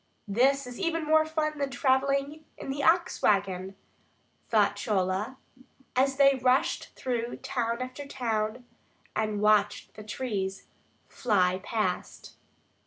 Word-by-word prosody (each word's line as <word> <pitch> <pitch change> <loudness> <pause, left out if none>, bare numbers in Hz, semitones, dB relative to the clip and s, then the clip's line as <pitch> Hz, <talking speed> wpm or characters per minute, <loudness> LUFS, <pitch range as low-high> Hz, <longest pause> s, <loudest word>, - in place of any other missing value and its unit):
This 265 +7 +2
is 245 -1 -9
even 330 -3 -1
more 315 0 +4
fun 305 -1 -1
than 280 -1 0
travelling 275 +3 +1
in - - -5
the 285 +1 -3
ox 340 +4 +2
wagon, 195 -1 +1 0.7
thought 205 -2 +3
Chola, 205 +3 -1 0.6
as 270 +1 +3
they 275 -1 +5
rushed 255 +1 +2
through 240 -2 -2
town 245 -2 -2
after 265 +3 -8
town 230 -2 -2 0.5
and 215 -1 -1
watched 210 -1 +2
the 215 - -10
trees 205 -4 -3 0.4
fly 185 -5 +1
past. 205 -5 -3
245 Hz, 120 wpm, -28 LUFS, 210-275 Hz, 0.7 s, they